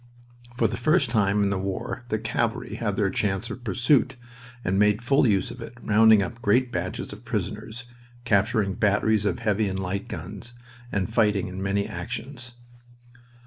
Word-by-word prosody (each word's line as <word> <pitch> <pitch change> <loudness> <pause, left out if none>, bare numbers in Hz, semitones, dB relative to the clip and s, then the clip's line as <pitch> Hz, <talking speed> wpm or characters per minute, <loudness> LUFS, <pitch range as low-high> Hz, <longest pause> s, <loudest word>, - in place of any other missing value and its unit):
For 115 - +3
the 115 +3 -4
first 140 0 +2
time 105 -2 +2
in 100 - +1
the 100 - -1
war 115 +6 -4
the 110 - 0
cavalry - - -2
had - - -2
their - - +1
chance 105 +3 -1
of 120 +2 -8
pursuit, 125 +4 +2 0.5
and 95 +2 +1
made 105 +2 +3
full 135 +1 +3
use 100 -4 +1
of - - -10
it, 120 - -9
rounding 110 -2 +5
up 115 +5 -7
great 120 +4 +2
batches 90 -1 -4
of 105 +3 -12
prisoners, 110 +2 -4 0.4
capturing 105 -1 +2
batteries 105 +1 +2
of 90 - 0
heavy 105 0 0
and 95 - -3
light 95 +1 -3
guns, 100 +8 -7 0.4
and 100 +2 -2
fighting 105 -5 +2
in 95 +1 -6
many 100 +1 0
actions. 120 +6 -6
105 Hz, 170 wpm, -25 LUFS, 100-120 Hz, 0.5 s, rounding